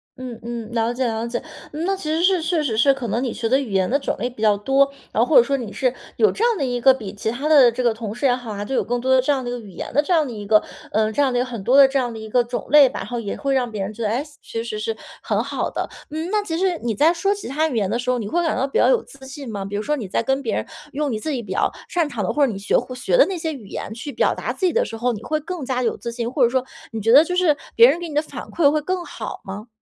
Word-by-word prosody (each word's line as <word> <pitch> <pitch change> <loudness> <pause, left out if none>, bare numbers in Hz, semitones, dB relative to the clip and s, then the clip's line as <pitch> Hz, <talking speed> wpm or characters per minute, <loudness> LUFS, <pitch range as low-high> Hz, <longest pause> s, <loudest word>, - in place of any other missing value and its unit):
嗯 255 -3 -8
嗯， 235 -1 -6
了 230 0 0
解 255 +1 -1
了 225 0 -2
解。 240 0 -3 0.3
那 335 +6 -1
其 380 - -10
实 320 +2 +1
是， 370 -1 +3
确 330 -1 0
实 225 -7 -1
是 275 +4 +5
可 265 -3 -5
能 235 - 0
你 245 - -2
学 225 -1 -2
的 265 +2 +4
语 250 -7 -5
言 190 -1 +1
的 280 +3 +2
种 - - -2
类 245 - -1
比 245 -3 -12
较 215 -2 +4
多， 270 +6 +3 0.2
然 220 - +1
后 - - -2
或 315 - +3
者 235 - +9
说 275 +2 0
你 230 -5 -6
是， 255 -1 0 0.2
有 435 - +4
这 445 - 0
样 470 -3 +2
的 280 - 0
一 245 -1 -1
个 265 +2 +6
比 215 -6 -7
其 205 +2 -3
他 265 +7 -2
的 280 -6 +7
这 250 +2 -3
个 235 - +3
同 220 -1 -6
事 280 - -3
也 250 - +5
好 245 -3 -7
啊， 205 0 -4
就 270 - -5
有 - - +2
更 245 0 -1
多 260 +1 +2
的 260 - +5
这 290 +3 +2
样 265 - -2
的 245 - -4
一 245 - -3
个 245 - -4
语 205 -4 -12
言 - - -7
的 290 - +4
这 355 +4 -1
样 315 -2 +3
的 255 - -6
一 205 -1 -7
个 215 0 +5 0.3
呃， 215 0 +1
这 285 - 0
样 265 -3 +2
的 - - +1
一 - - +2
个 250 - 0
很 235 -4 -6
多 250 - +3
的 280 - +10
这 270 +1 0
样 245 -3 -2
的 - - -7
一 220 0 -8
个 245 +3 +3
种 240 +1 -5
类 295 -2 +8
吧， - - -5
然 - - -6
后 240 - -3
也 205 -3 -4
会 275 0 -1
让 255 -2 +1
别 215 -3 -5
人 205 - -5
觉 230 - -9
得， 210 - +1
诶， 245 +6 0 0.2
其 225 0 -5
实 215 -2 -5
是 220 +1 -2 0.3
很 - - 0
好 - - -2
的。 - - -4 0.2
嗯， 315 +3 -4
那 425 -1 +2
其 330 -5 -3
实 365 -2 +1
你 225 -3 -1
在 320 - +4
说 390 +4 +1
其 405 - -7
它 305 +4 +1
语 285 - -4
言 200 -4 +1
的 235 - -1
时 245 +1 -3
候， 250 - +2
你 210 - -4
会 345 - +1
感 325 - 0
到 270 - +1
比 275 - -1
较 - - +5
有 - - +3
自 265 -1 -14
信 265 -3 -8
吗？ 200 -2 -4
比 200 - -5
如 205 - -1
说 300 - 0
你 220 -8 -5
在 195 - -1
跟 270 +3 0
别 235 - -2
人 - - -2 0.3
用 290 0 -1
你 220 - -2
自 310 - -4
己 250 -4 -3
比 190 - -9
较 - - +2 0.2
擅 340 -3 +1
长 225 -6 -3
的， 180 - 0
或 290 -1 +4
者 235 - -2
你 195 - -6
学 200 - +1
会 255 - -4
学 380 - +1
的 - - +7
那 385 - -3
些 320 -1 -2
语 240 -8 -10
言 205 - -6
去 250 +6 -6
表 - - +2
达 - - -4
自 375 - -2
己 355 - +3
的 480 +2 +2
时 225 - -7
候， 245 +2 0
你 210 - -7
会 310 +5 -1
更 325 -3 -5
加 250 -1 -1
有 230 - 0
自 235 - -5
信， 235 -1 -3
或 260 0 +2
者 - - +2
说 260 +1 0 0.3
你 225 -2 -4
觉 225 - +2
得 280 +5 +9
就 360 - -2
是 360 -5 +3 0.2
别 470 +1 +8
人 340 - +1
给 345 - -5
你 295 - -7
的 300 - +3
反 315 - -8
馈 305 -5 +3
会 305 - +1
更 365 +3 -2
好 - - -7
吗？ 200 +4 -7
255 Hz, 375 characters per minute, -22 LUFS, 225-300 Hz, 0.3 s, 的